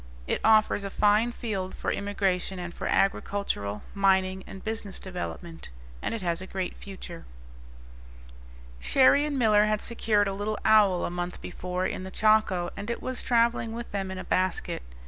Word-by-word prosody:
It - - -1
offers 215 -2 +4
a 200 - -3
fine 210 +4 +3
field 200 -6 -4
for - - -2
immigration 195 -2 -1
and 175 -1 -6
for - - -4
agricultural, 195 - 0
mining, 190 -1 +2
and 195 - -10
business 215 -3 -4
development; 175 -2 -7 0.3
and - - -2
it 220 - -5
has 170 0 -1
a 185 - -7
great 190 -1 -3
future. 185 -3 -9 1.6
Cherrie 280 - +4
and 290 -2 -2
Miller 215 -4 +5
had 215 0 +1
secured 215 -3 +1
a 195 - -1
little 205 +2 -2
owl 210 -5 +5
a - - -3
month 175 0 -4
before 180 0 -4
in - - -2
the 190 - -6
Chaco, 210 -4 +2
and 200 +3 -6
it 235 - -2
was 255 -1 -4
travelling 235 -1 +2
with 235 +1 -6
them 195 -1 -2
in 190 - -5
a - - -5
basket. 185 - -1
200 Hz, 170 wpm, -27 LUFS, 185-215 Hz, 1.6 s, Miller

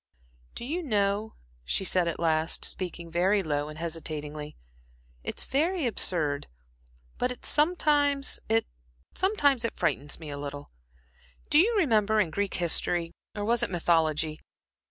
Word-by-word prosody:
"Do - - -6
you 325 +7 -2
know," 210 - 0 0.3
she 65 - 0
said 180 -1 +2
at 170 - -2
last, 160 -1 +1
speaking 175 -2 -5
very 190 +4 +2
low 145 -2 -1
and 155 - -9
hesitatingly, 155 -2 -5 0.7
"it's - - 0
very 325 +4 +1
absurd, 160 -10 +1 0.7
but 250 - +1
it 250 - -7
sometimes 295 -3 +2
it 115 0 +3 1.1
frightens 145 -3 -1
me 155 -3 -7
a 145 - -5
little. 145 0 -7 0.8
Do 300 - +7
you 440 +6 +4
remember 220 - +3
in 180 -6 +1
Greek 200 +3 -1
history 170 0 +1 0.2
or 205 -1 -3
was 235 +1 +2
it - - +1
mythology? 160 -3 +1
175 Hz, 135 wpm, -28 LUFS, 155-235 Hz, 1.1 s, Do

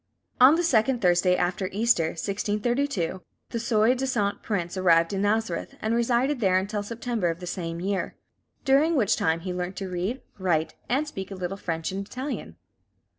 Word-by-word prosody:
On 260 +5 +8
the 345 - +1
second 245 -4 +3
Thursday 180 -1 +3
after 180 +1 -1
Easter, 210 -5 +2
1632, 205 - -1 0.3
the 230 - -2
soi 225 0 +3
disant 250 -6 -1
prince 175 -5 -2
arrived 170 -2 +3
in 195 - -1
Nazareth, 220 +2 -1
and 220 +1 -1
resided 240 +4 +1
there 190 -4 +3
until 205 +2 -1
September 230 -3 -2
of 165 0 -3
the 180 - -7
same 170 -2 -4
year; 195 +1 -2 0.5
during 295 +5 +4
which 225 -8 +3
time 160 +1 0
he 180 +1 -4
learnt 180 +1 -4
to 195 -2 -5
read, 185 +9 -3 0.2
write, 165 -4 0 0.2
and 280 +5 +1
speak 195 -9 -6
a 195 - -6
little 185 +1 -4
French 165 -4 -3
and 195 +1 -3
Italian. 260 +5 -5
200 Hz, 175 wpm, -26 LUFS, 180-240 Hz, 0.5 s, On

